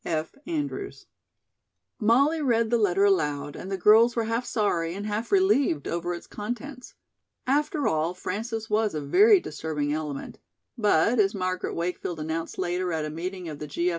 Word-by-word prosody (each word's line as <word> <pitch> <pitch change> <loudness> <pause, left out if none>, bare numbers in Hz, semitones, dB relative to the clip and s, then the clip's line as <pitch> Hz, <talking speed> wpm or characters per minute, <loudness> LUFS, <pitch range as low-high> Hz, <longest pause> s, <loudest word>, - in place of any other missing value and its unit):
"F. 160 -1 -2
ANDREWS." 335 +4 -4 0.9
Molly 275 +8 +3
read 230 -4 +1
the 235 - +3
letter 200 -2 +2
aloud 145 -7 0
and 190 - -7
the 195 - -1
girls 220 +5 +5
were 230 - +1
half 230 +2 -2
sorry 175 -6 0
and 200 +1 -5
half 215 +2 -3
relieved 285 - +3
over 175 +1 -2
its 170 - -10
contents. 245 +5 -7 0.5
After 295 +3 +1
all, 160 +3 0
Frances 220 +4 -4
was 215 -3 +1
a - - -1
very 405 - +6
disturbing 150 - -3
element, 150 -3 -5 0.4
but 210 0 +3
as 200 0 +3
Margaret 185 -1 -2
Wakefield 170 -1 -3
announced 160 +2 -4
later 180 0 -1
at 160 -2 -1
a 155 - -5
meeting 180 +3 -5
of 150 -2 -7
the 150 - -6
G. 170 +5 0
195 Hz, 165 wpm, -26 LUFS, 165-235 Hz, 0.9 s, very